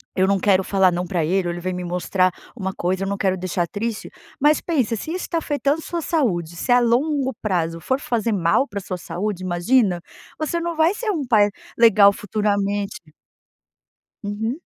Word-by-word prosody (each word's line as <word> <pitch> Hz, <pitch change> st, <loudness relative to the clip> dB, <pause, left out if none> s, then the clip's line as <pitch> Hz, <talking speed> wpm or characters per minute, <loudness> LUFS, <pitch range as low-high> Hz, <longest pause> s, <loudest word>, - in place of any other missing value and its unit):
eu 190 Hz, 0 st, +3 dB
não 200 Hz, 0 st, +2 dB
quero 190 Hz, 0 st, +3 dB
falar 190 Hz, -1 st, +3 dB
'não' 175 Hz, +1 st, -2 dB
pra 175 Hz, -2 st, 0 dB
ele, 180 Hz, +3 st, +1 dB
ou 170 Hz, -, -1 dB
ele 175 Hz, -, -6 dB
vem 185 Hz, +1 st, -2 dB
me 180 Hz, 0 st, -4 dB
mostrar 180 Hz, +1 st, +1 dB, 0.3 s
uma 190 Hz, -3 st, -3 dB
coisa, 185 Hz, +2 st, -1 dB
eu -, -, -2 dB
não 200 Hz, 0 st, -2 dB
quero 190 Hz, -1 st, +1 dB
deixar 180 Hz, -1 st, -2 dB
triste", 220 Hz, +4 st, -4 dB, 0.3 s
mas 300 Hz, +2 st, +4 dB
pensa 260 Hz, -10 st, 0 dB
se 270 Hz, +9 st, -5 dB
isso 365 Hz, -, -4 dB
tá 335 Hz, -, 0 dB
afetando 290 Hz, -2 st, 0 dB
a -, -, -7 dB
sua 340 Hz, -1 st, -3 dB
saúde, 185 Hz, -, -1 dB
se 245 Hz, -, -2 dB
a 245 Hz, -, +7 dB
longo 265 Hz, +3 st, +1 dB
prazo 165 Hz, -5 st, -1 dB
for 260 Hz, +10 st, -1 dB
fazer 235 Hz, -4 st, -1 dB
mal 200 Hz, +7 st, +2 dB
pra 200 Hz, -4 st, -5 dB
sua 185 Hz, -1 st, -5 dB
saúde, 185 Hz, +2 st, -4 dB
imagina, 185 Hz, +1 st, +2 dB, 0.4 s
você 315 Hz, +2 st, -1 dB
não 340 Hz, 0 st, -3 dB
vai 320 Hz, +3 st, +3 dB
ser 440 Hz, -1 st, -1 dB
um 310 Hz, -8 st, -2 dB
pai 210 Hz, -3 st, +4 dB, 0.3 s
legal 215 Hz, -3 st, +7 dB
futuramente. 205 Hz, -4 st, -2 dB, 1.1 s
Uhum. 220 Hz, +8 st, -3 dB
205 Hz, 195 wpm, -22 LUFS, 185-260 Hz, 1.1 s, a